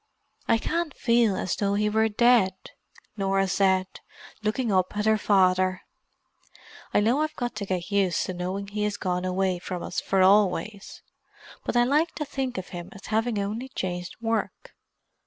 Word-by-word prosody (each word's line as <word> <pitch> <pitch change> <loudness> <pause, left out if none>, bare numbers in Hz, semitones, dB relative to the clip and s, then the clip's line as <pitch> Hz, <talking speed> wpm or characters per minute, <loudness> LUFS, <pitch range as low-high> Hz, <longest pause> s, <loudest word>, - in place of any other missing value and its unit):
"I 230 - +4
can't 330 +5 -2
feel 230 -4 +3
as 185 - -2
though 200 -1 0
he 210 +1 +1
were 220 +1 +2
dead," 220 -4 +4 0.6
Norah 195 -1 +1
said, 190 0 +2 0.6
looking 215 +2 -1
up 185 +1 +1
at 210 - 0
her 220 0 +3
father. 185 -2 +2 1.1
"I - - +3
know 240 +8 +2
I've 310 0 -2
got 245 -1 -3
to 200 -2 -4
get 185 +1 -3
used 195 -4 +1
to 185 - -4
knowing 185 +3 -4
he 210 +1 -4
has 205 -1 -2
gone 180 -1 -2
away 185 0 0
from 180 -1 -5
us - - -3
for 190 -1 +2
always. 200 +1 +1 0.6
But - - -1
I 240 - +6
like 300 +6 +1
to 300 - -3
think 265 -4 -3
of 185 - -5
him 175 -1 -7
as 195 - -12
having 225 0 +1
only 215 +6 -3
changed 180 -5 -4
work. 230 - -3
200 Hz, 175 wpm, -26 LUFS, 185-230 Hz, 1.1 s, I